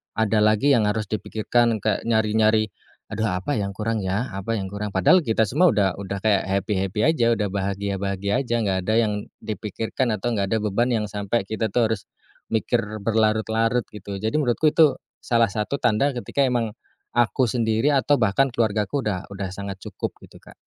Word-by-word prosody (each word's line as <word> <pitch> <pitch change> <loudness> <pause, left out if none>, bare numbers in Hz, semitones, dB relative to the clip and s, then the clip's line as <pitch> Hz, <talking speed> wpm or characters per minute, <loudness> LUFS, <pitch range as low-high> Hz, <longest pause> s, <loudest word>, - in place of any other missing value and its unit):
ada 110 -1 +2
lagi 110 +7 +3
yang 110 -5 +4
harus 105 -1 -1
dipikirkan 110 +2 0
kayak 110 - -1
nyari-nyari, 110 -1 +2 0.4
"Aduh 110 - -2
apa 130 +9 -2
yang 100 -2 -2
kurang 105 +1 -2
ya? 100 +7 -1
Apa 100 +3 -4
yang 95 - -4
kurang?" 100 +1 -5
Padahal 95 - +4
kita 110 -3 +1
semua 170 - +4
udah 100 -4 +1
udah 100 0 -5
kayak 105 -2 +2
happy-happy 95 - 0
aja, 120 -8 +3
udah 105 -3 0
bahagia-bahagia 100 +3 -2
aja, 120 -1 -1
nggak 95 -4 0
ada 110 - 0
yang 110 -2 +1 0.3
dipikirkan 110 +3 -3
atau 110 +3 -1
nggak 100 -1 0
ada 110 - +3
beban 110 +4 0
yang 110 -2 0
sampai 100 0 -2
kita 110 -1 -2
tuh 115 -1 +2
harus, 100 - -2 0.5
mikir 115 +1 +1 0.2
berlarut-larut 110 +2 +1
gitu. 100 -1 -6
Jadi 110 +6 -2
menurutku 150 +1 +2
itu, 150 -1 +4 0.2
salah 115 -2 +3
satu 105 +8 -3
tanda 120 +4 +2
ketika 130 +2 -1
emang, 120 -4 0 0.4
aku 120 +1 +2
sendiri 115 +5 +1
atau 140 0 +2
bahkan 120 +5 +2
keluargaku 110 +2 0
udah 95 -4 -2
udah 95 -1 -4
sangat 100 -1 -6
cukup - - -5
gitu, - - -16
Kak. - - -15
110 Hz, 175 wpm, -23 LUFS, 100-120 Hz, 0.5 s, yang